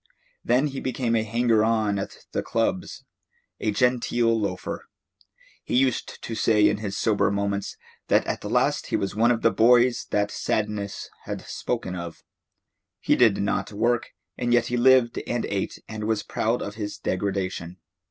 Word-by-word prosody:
Then 125 +4 +3
he 140 -2 -3
became 125 -2 -1
a 110 - +3
hanger 115 0 +2
on 110 -3 +1
at 95 - -7
the - - -1
clubs, - - -2 0.6
a - - 0
genteel 120 0 +2
loafer. 100 -3 -4 0.8
He - - -2
used 130 0 0
to 115 - -5
say 105 -2 +4
in 105 0 +1
his 100 -1 -4
sober 105 -4 +2
moments 100 0 -2 0.3
that - - +3
at - - -3
last - - +1
he - - -1
was 100 - -2
one 115 +2 +4
of 120 -2 +1
the 115 - +5
boys 120 +2 +4
that 105 0 0
Sadness 105 -2 -2 0.2
had - - -4
spoken 90 - -3
of. 85 -2 -7 0.8
He - - +2
did 110 -5 +4
not 100 - -1
work, 115 +3 0 0.3
and 120 -1 0
yet 120 -1 +4
he 125 - -2
lived 125 -1 +4
and 120 -1 -1
ate 100 -1 -3
and 110 -1 -5
was 110 -1 0
proud 115 +3 -1
of 100 - -5
his 105 -1 -5
degradation. 95 -2 -3
110 Hz, 165 wpm, -25 LUFS, 100-120 Hz, 0.8 s, the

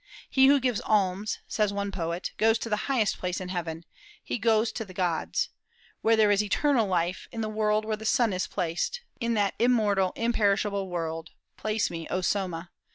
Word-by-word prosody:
"He 265 0 +6
who 280 +1 +6
gives 250 -4 0
alms," 205 0 +1
says 210 -2 +1
one 200 0 -2
poet, 170 -1 -3
"goes 225 +1 +4
to 230 - -5
the 210 - +2
highest 230 -7 +1
place 180 0 -2
in 185 -1 -6
heaven: 170 -2 -4 0.4
he - - -3
goes 220 0 +3
to 225 - -4
the 185 -4 -13
gods.... 175 -3 0 0.5
Where 225 0 +4
there 215 -2 +4
is 205 0 +4
eternal 230 +2 +2
light, 180 -1 0
in 225 - -4
the 215 - -1
world 215 0 +1
where 215 -1 -1
the 220 - -10
sun 230 -1 +2
is 185 - -1
placed, 180 - -2 0.2
in 235 -2 0
that 205 -2 +1
immortal, 210 -6 +3
imperishable 205 -4 +1
world, 165 -2 -3 0.3
place 215 0 -1
me, 165 -1 -5
O 185 - -1
Soma! 180 -3 -2
205 Hz, 190 wpm, -27 LUFS, 180-225 Hz, 0.5 s, He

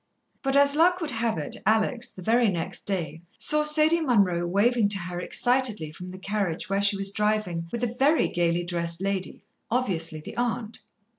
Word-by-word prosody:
But 270 0 0
as 280 0 +4
luck 355 +3 +3
would 320 -4 -1
have 225 -4 -1
it, 150 - -3
Alex, 220 +3 +1
the 185 - -12
very 230 +2 +3
next 170 -4 -5
day, 165 -5 -2 0.2
saw 300 0 +4
Sadie 305 +2 +4
Munroe 195 - +1
waving 210 +4 +2
to 205 - 0
her 175 -1 -5
excitedly 240 -6 0
from 180 +4 -10
the 185 - -9
carriage 195 -2 -3
where 195 0 0
she 200 0 +3
was 195 0 0
driving 210 -6 -1
with 235 0 -4
a 240 0 -2
very 295 +4 +3
gaily 175 0 0
dressed 170 -1 -3
lady, 195 -1 -4 0.2
obviously 175 -10 -1
the 155 - -10
aunt. 235 -2 -3
205 Hz, 180 wpm, -25 LUFS, 175-245 Hz, 0.2 s, as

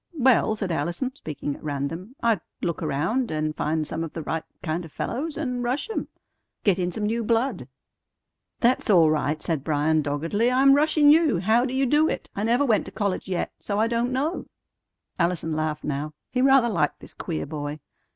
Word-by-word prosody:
"Well," 245 -4 +4
said 195 -4 -3
Allison, 175 - -2
speaking 145 - -5
at - - -15
random, 155 - -4
"I'd 225 -6 +2 0.2
look 170 -2 -1
around, 220 - 0
and 155 0 -2
find 155 0 -1
some 160 +2 -3
of 165 - -6
the 165 - -5
right 160 +2 -2 0.2
kind 165 +1 -2
of 165 - -11
fellows, 295 - -3
and 250 -5 -2
rush 260 - -1
'em. - - -3 0.6
Get 195 -3 +3
in 180 0 0
some 210 +3 -3
new 230 +2 0
blood." 230 +4 0 0.9
"That's 245 0 +2
all 170 -6 +6
right," 150 0 0
said 160 -5 -2
Bryan 155 +1 +2
doggedly. 165 +11 0
"I'm 270 +2 +6
rushin' 295 0 +5
you. 310 - +4
How 225 +5 +3
do 260 - -3
you 270 +1 +2
do 300 +5 +3
it? - - -5
I 200 - -2
never 240 +6 +2
went 220 -5 +2
to - - -8
college 200 -3 -2
yet; 180 - -1
so 205 0 -2
I 220 - +4
don't 235 +2 0
know." 290 +7 -1 0.7
Allison 170 -2 0
laughed 155 -1 -2
now. 150 +1 -3 0.2
He 250 - 0
rather 270 -2 +5
liked 190 -7 0
this - - -12
queer 75 - -4
boy. 145 0 -5
200 Hz, 195 wpm, -25 LUFS, 155-250 Hz, 0.9 s, all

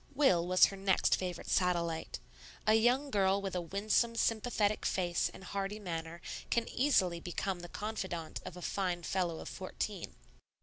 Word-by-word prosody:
Will 185 - +4
was 185 0 +7
her 195 - -3
next 195 -1 +3
favorite 180 -2 -4
satellite. 170 -3 0 0.5
A 215 - +5
young 245 +6 +3
girl 195 -2 +3
with 195 -2 -4
a 180 - 0
winsome, 210 +6 +1
sympathetic 220 -2 +1
face, 175 -2 +1
and - - -12
hearty 195 +2 -3
manner, 170 -4 -5 0.3
can 235 -1 +1
easily 190 -11 +2
become 180 +2 -3
the 175 0 -8
confidante 190 -7 -4
of 180 - -8
a 180 - -8
fine 180 -3 -1
fellow 175 -2 -1
of - - -8
fourteen. - - -5
190 Hz, 160 wpm, -33 LUFS, 175-215 Hz, 0.5 s, was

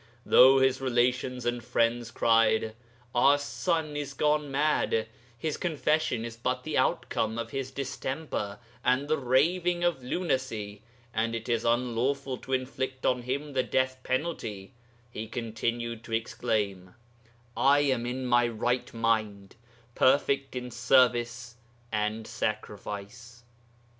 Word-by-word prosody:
Though 130 +2 +7
his 130 0 +3
relations 125 0 0
and 120 0 -1
friends 120 -1 +1
cried, 115 -1 +3 0.4
"Our 140 +4 +5
son 155 +1 -2
is 145 -2 -4
gone 150 0 +1
mad; 135 -5 +1 0.3
his 155 +4 -2
confession 155 -7 0
is 115 -1 -6
but 115 - -2
the - - -3
outcome 110 0 0
of 115 0 -4
his 135 -1 -3
distemper 135 -5 -4 0.3
and 130 +3 +2
the 155 0 +1
raving 170 +7 +2
of 170 -7 0
lunacy, 125 - -2 0.3
and 115 +1 0
it 115 0 -5
is 115 -1 0
unlawful 125 +3 0
to 130 - -6
inflict 130 0 -2
on 125 -1 +2
him 140 +4 -3
the 130 - +2
death 130 +1 0
penalty," 130 - -3 0.4
he 110 -1 -5
continued 115 0 -3
to 115 - -7
exclaim, 105 -5 -2 0.6
"I 140 +2 +4
am 130 -4 +1
in 130 +1 -3
my 120 -1 +4
right 120 +2 -1
mind, 110 -4 -1 0.4
perfect 135 +1 +2
in 125 0 -5
service 120 -1 +2 0.3
and 105 +1 -1
sacrifice." 110 +3 -5
125 Hz, 130 wpm, -28 LUFS, 115-135 Hz, 0.6 s, Though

